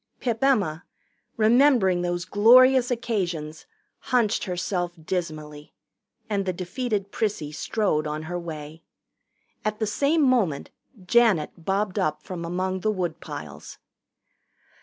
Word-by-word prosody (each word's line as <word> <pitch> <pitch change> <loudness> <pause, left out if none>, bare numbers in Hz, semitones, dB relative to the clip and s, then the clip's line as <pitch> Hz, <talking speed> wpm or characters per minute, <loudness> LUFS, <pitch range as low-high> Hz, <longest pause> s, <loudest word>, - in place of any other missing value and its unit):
Pip 235 -1 -2
Emma, 195 - +2 0.5
remembering 225 -5 +4
those 175 0 -2
glorious 250 +6 +6
occasions, 180 -11 -3 0.3
hunched 235 -4 +1
herself 180 -1 -2
dismally, 155 -3 -5 0.5
and 205 -3 -1
the 185 - 0
defeated 200 +2 -3
Prissy 200 -9 -2
strode 155 -1 -1
on 150 +1 -4
her 175 +2 -4
way. 160 -1 -8 0.8
At 215 0 -1
the 220 - -1
same 285 +9 +1
moment 220 - +1 0.3
Janet 215 -8 +3
bobbed 195 +3 -2
up 155 -5 -1
from 180 -2 -6
among 185 +2 -2
the 215 - 0
woodpiles. 175 -5 -6
185 Hz, 115 wpm, -25 LUFS, 170-225 Hz, 0.8 s, glorious